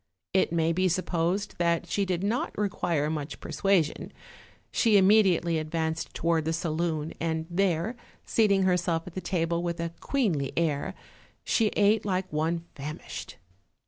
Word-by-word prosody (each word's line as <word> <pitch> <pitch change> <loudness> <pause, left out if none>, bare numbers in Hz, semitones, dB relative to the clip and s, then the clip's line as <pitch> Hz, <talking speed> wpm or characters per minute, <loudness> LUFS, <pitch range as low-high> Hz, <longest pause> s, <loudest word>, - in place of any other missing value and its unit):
It 190 - +3
may 165 0 +2
be 185 +2 +2
supposed 180 +3 -1
that 170 -1 +1
she 200 - 0
did 180 -1 -1
not 225 +5 -1
require 175 -7 0
much 150 -2 -4
persuasion; 190 -6 0 0.6
she 220 -3 +4
immediately 190 -5 +4
advanced 160 0 -2
to - - -7
ward 165 -2 +2
the 160 - 0
saloon, 160 -1 -1
and 160 -1 -1
there, 180 +3 +1 0.3
seating 200 -4 +3
herself 175 -3 +1
at 180 - -9
the 185 - -4
table 170 -2 0
with 170 -1 -3
a 170 0 -3
queenly 180 - 0
air, 155 -4 0 0.5
she 225 - +2
ate 210 +1 +4
like 185 -4 -2
one 165 +2 0
famished. 150 +2 -7
170 Hz, 145 wpm, -28 LUFS, 160-190 Hz, 0.6 s, she